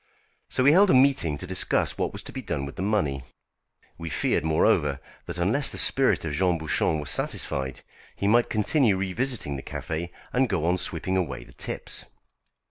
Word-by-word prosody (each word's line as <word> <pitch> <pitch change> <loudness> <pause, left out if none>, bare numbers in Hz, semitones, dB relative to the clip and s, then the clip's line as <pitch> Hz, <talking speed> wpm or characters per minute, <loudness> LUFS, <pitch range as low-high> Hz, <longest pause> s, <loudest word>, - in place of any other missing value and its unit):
So 130 - +1
we 140 - +7
held 195 +5 +6
a - - +5
meeting 130 - +3
to 90 - -7
discuss 95 0 0
what - - -1
was - - -7
to - - -7
be - - -5
done 70 - -3
with 70 - -8
the - - -5
money. 95 -10 0 0.8
We 85 -1 -5
feared, 75 - 0
moreover, 75 -3 +2 0.3
that 85 -1 -5
unless 110 +12 +1
the - - -6
spirit 135 -9 +2
of 75 - -3
Jean 90 +2 +2
Bouchon 80 0 +1
were 75 - -5
satisfied, 65 -2 -2 0.3
he 100 - -1
might 120 +3 +4
continue 110 -1 +2
revisiting 100 - -2
the - - -6
café 80 +5 -4 0.2
and 125 0 +2
go 85 -5 0
on 90 +2 +2
sweeping 90 +3 -1
away 90 -3 -2
the - - -17
tips. - - -5
90 Hz, 190 wpm, -26 LUFS, 80-120 Hz, 0.8 s, we